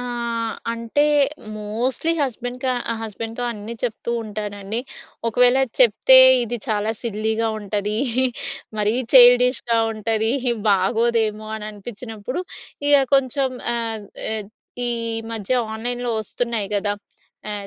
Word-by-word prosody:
ఆహ్, 235 -2 -3 0.2
అంటే 230 +5 0 0.5
mostly 235 +9 -1
husband 250 -1 -3
క - - +1 0.3
ఆహ్, 225 - -5
హస్బెండ్‌తో 225 +2 -5
అన్నీ 215 +2 -7
చెప్తూ 235 0 -3
ఉంటానండి. 210 +1 -4 0.5
"ఒకవేళ 245 +3 +4 0.2
చెప్తే 255 +2 +7 0.3
ఇది 240 +1 -3
చాలా 215 0 0
సిల్లీగా 220 0 -1
ఉంటది, 205 +1 -2 0.8
మరీ 210 +2 +2 0.2
చైల్డిష్‌గా 245 -1 +6
ఉంటది, 220 +1 0 0.4
బాగోదేమో" 215 +2 +1
అని 210 -1 -7
అనిపించినప్పుడు 225 - -6 0.5
ఇగ 290 - +7 0.2
కొంచెం 270 0 +2 0.3
ఆహ్, 225 -3 -3 0.3
ఎద్ 210 -2 -5 0.4
ఈ - - 0 0.4
మధ్య 220 +2 -2 0.2
ఆన్లైన్‌లో 245 +2 -3
ఒస్తున్నాయి 225 -2 -2
గదా! 205 0 0 0.6
ఆహ్, 205 -1 -4
225 Hz, 110 wpm, -22 LUFS, 210-245 Hz, 0.8 s, చెప్తే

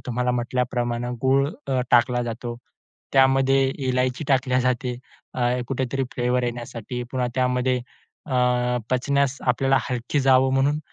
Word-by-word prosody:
तुम्हाला 125 0 0
म्हटल्याप्रमाणे 120 0 -1
गूळ 135 +1 +3 0.2
अ, 130 -1 +1
टाकला 120 +1 +4
जातो, 120 0 -5 0.6
त्यामध्ये 135 0 +4 0.2
इलायची 125 +3 0
टाकली 130 -1 +2
जाते. 125 0 -1 0.4
अ, 125 - -4 0.3
कुठेतरी 135 0 -1
फ्लेवर 125 0 0
येण्यासाठी, 120 0 -5
पुन्हा 125 -1 0
त्यामध्ये 125 0 +1 0.5
अ, 135 - -6 0.6
पचण्यास 140 +1 +1
आपल्याला 135 +2 +3
हलकी 125 +3 -2
जावं 130 0 +4
म्हणून 140 +3 +2
125 Hz, 120 wpm, -23 LUFS, 125-135 Hz, 0.6 s, टाकला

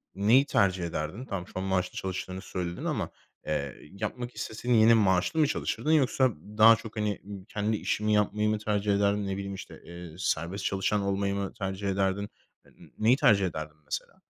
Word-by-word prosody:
neyi 115 +8 +5
tercih 95 -6 +2
ederdin? 85 +9 -4
Tamam, 95 -6 -5
şu - - -16
an 95 - -2
maaşlı 95 -1 -1
çalıştığını 95 0 -4
söyledin 90 -2 -4
ama, - - -1 0.4
eee, 70 -3 -2 0.2
yapmak 120 +5 -5
isteseydin 120 +3 -1
yine 110 +1 +7
maaşlı 105 - +3
mı 150 - +5
çalışırdın 155 0 -1
yoksa 130 -3 +4 0.3
daha 115 +1 +9
çok, 110 0 -10
hani, 105 -2 -1 0.3
kendi 105 +1 -1
işini 105 +1 0
yapmayı 105 0 +2
mı 110 -1 0
tercih 105 -1 0
ederdin? 100 0 +1
Ne 95 - -1
bileyim, 100 0 -4
işte, 95 - -10
eee, 85 -2 -9
serbest 90 +2 -1
çalışan 100 +2 +1
olmayı 100 0 0
mı 100 -1 -3
tercih 95 -2 -4
ederdin? 95 +1 0 0.4
N - - -18
neyi 115 +4 +5
tercih 105 -10 +4
ederdin 80 -3 -5
mesela? - - -6
100 Hz, 175 wpm, -28 LUFS, 95-110 Hz, 0.4 s, daha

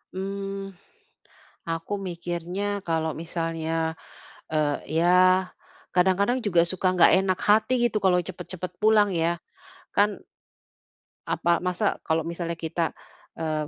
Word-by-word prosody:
Mmm. 195 0 -4 1.0
Aku 165 +5 -3
mikirnya 175 +1 -4 0.2
kalau 160 -1 0
misalnya, 165 -1 -2 0.6
eee, 155 -2 +1 0.3
ya, 175 - +3 0.9
kadang-kadang 190 +7 +3
juga 175 -4 +4
suka 185 +2 -1
nggak 180 - +6
enak 190 -1 0
hati 215 +4 +4 0.2
gitu, 215 - 0
kalau 185 -2 +4
cepet-cepet 180 0 -7
pulang 215 -1 +5
ya. 170 -1 0 0.6
Kan 205 0 +2 1.1
apa 170 -1 +1
masa 180 +3 -1
kalau 160 0 +1
misalnya 170 +1 -4
kita, 165 0 -2 0.4
eee, 155 -2 -2
175 Hz, 110 wpm, -25 LUFS, 165-195 Hz, 1.1 s, nggak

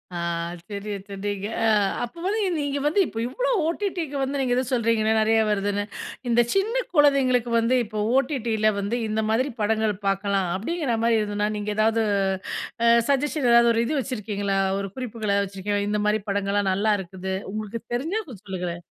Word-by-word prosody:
ஆ - - -2 0.5
சரியா 205 0 -4
சொன்னீங்க. 200 0 -4 0.2
ஆ 225 - +4 0.3
அப்போ 240 +8 -7
வந்து 425 +3 0 0.2
நீங்க 285 -1 -1
வந்து, 305 +7 +2
இப்ப - - -9
இவ்ளோ - - -1 0.2
ஓ.டி.டிக்கு 340 -4 -2
வந்து 275 +1 -1
நீங்க 250 -2 +1
ஏதோ 255 - +2
சொல்றீங்களே, 230 -2 +2
நெறைய 225 +1 +3
வருதுன்னு! 205 0 0 0.5
இந்த 240 0 +5
சின்ன 405 +5 +1 0.2
குழந்தைங்களுக்கு 260 -5 +4
வந்து, 230 +3 +2
இப்போ 215 0 -4
ஓடிடியில 235 -6 +1
வந்து 200 +4 -1
"இந்த 220 0 -1
மாதிரி 250 +6 +1
படங்கள் 215 0 +1
பாக்கலாம்" 195 -1 +1
அப்படிங்கிற 270 - -1
மாதிரி 230 -1 +4
எதுன்னா, 205 0 -1
நீங்க 210 0 -3
ஏதாவது 225 +1 +3 0.8
அ - - +5 0.2
சஜ்ஜஷன் 280 -1 +1
ஏதாவது 235 0 +6
ஒரு 230 - +2
இது 295 +3 0
வச்சுருக்கீங்களா? 205 -6 -2 0.2
ஒரு 200 0 -4
குறிப்புகள 220 -5 -1
வச்சுருக்கீங்களா? 200 +1 -2
இந்த 210 0 0
மாரி 210 0 +2
படங்கள்லாம் 200 0 +1
நல்லா 210 +3 +2
இருக்குது. 190 +1 -5 0.2
உங்களுக்கு 215 +2 -5
தெரிஞ்சா 325 - -1
கொஞ்சம் 210 -7 -12
சொல்லுங்களேன். 175 -2 -4
220 Hz, 160 wpm, -24 LUFS, 205-260 Hz, 0.8 s, ஏதாவது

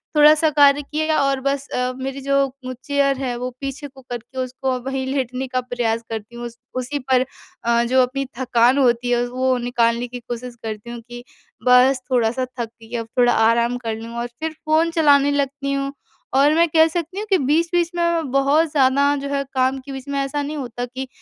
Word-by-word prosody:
थोड़ा-सा 305 +1 +6
कार्य 285 -1 +5
किया 310 +2 -1
और 275 -1 +1
बस 275 +1 -1
अ, 250 0 -1
मेरी 270 +1 -5
जो 275 0 +1 0.3
चेयर 280 -1 +1
है 260 -2 -2
वो 250 +1 -3
पीछे 275 +1 -5
को 270 -1 -16
करके 245 +2 -7
उसको 255 0 -2
वही 265 +1 -3
लेटने 265 -1 -2
का 255 0 -1
प्रयास 240 -2 -1
करती 225 +1 -6
हूँ 240 0 -6
उस 235 0 -8 0.2
उसी 255 +3 -2
पर 260 -1 +2 0.4
अ, 235 0 +2
जो 255 +2 +3
अपनी 275 +2 -2
थकान 245 0 +3
होती 245 -2 +2
है, 240 0 +2
वो 255 +1 0
निकालने 240 0 0
की 245 +1 -7
कोशिश 240 +1 -7
करती 220 +1 -6
हूँ 240 0 -6
कि 240 +1 -10 0.4
बस 250 +1 +5
थोड़ा-सा 245 +1 +1
थक 235 - 0 0.2
गई 225 +2 -8
अब 230 -1 -5
थोड़ा 245 -1 +5
आराम 235 +2 +3
कर 230 -3 -4
लूँ 230 +1 -8
और 240 - -2
फिर 320 0 -2
फ़ोन 315 +2 +2
चलाने 285 -3 +4
लगती 280 0 -1
हूँ। 275 0 -2 0.5
और 285 +2 +5
मैं 335 +2 +4
कह 320 +1 +5
सकती 340 +3 -4
हूँ 425 - -4
कि 385 - +4
बीच-बीच 335 +4 +1
में 345 - -1
मैं 335 -4 0
बहुत 280 +4 +3
ज़्यादा 280 0 +3
जो 280 0 -5
है, 280 0 -1
काम 260 0 +1
के 265 +1 -10
बीच 265 0 -7
में 280 0 -2
ऐसा 275 +1 -1
नहीं 295 +2 -4
होता 245 -3 -4
कि 260 +2 -6
265 Hz, 205 wpm, -21 LUFS, 245-285 Hz, 0.5 s, थोड़ा-सा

